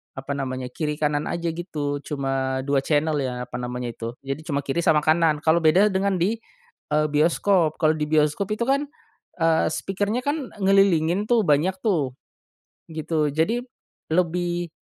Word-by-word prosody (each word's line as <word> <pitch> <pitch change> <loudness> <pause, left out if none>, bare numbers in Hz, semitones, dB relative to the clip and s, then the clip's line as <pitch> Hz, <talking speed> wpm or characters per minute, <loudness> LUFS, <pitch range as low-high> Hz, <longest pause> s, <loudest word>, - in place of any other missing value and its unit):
apa 135 +1 -6
namanya 130 -2 -3
kiri 150 +2 -2
kanan 150 -1 +1
aja 170 -1 -2
gitu 150 -5 -3
cuma 135 -2 -2
2 140 -1 +3
channel 155 +1 +1
ya, 125 -1 -4
apa - - -9
namanya 125 0 -4
itu. 115 0 -5
Jadi 135 +3 -4
cuma 140 -3 0
kiri 140 +5 -1
sama 155 -2 +4
kanan, 155 -1 +3
kalau 160 +1 +4
beda 180 +7 +5
dengan 195 +1 +1
di, 195 +7 +1 0.6
eee, 150 0 +2
bioskop. 165 +2 +2
Kalau 155 -1 +3
di 155 - -2
bioskop 155 +6 +1
itu 215 +2 0
kan, 280 +2 +1 0.5
eee, 165 -1 +3
speaker-nya 200 +7 -1
kan 285 -2 -2
ngelilingin 195 -1 +3
tuh 230 -3 +4
banyak 150 +6 +3
tuh. 160 - +1 0.8
Gitu, 155 -1 -1
jadi 165 +11 +1 0.5
lebih 175 0 0
160 Hz, 160 wpm, -24 LUFS, 145-185 Hz, 0.8 s, beda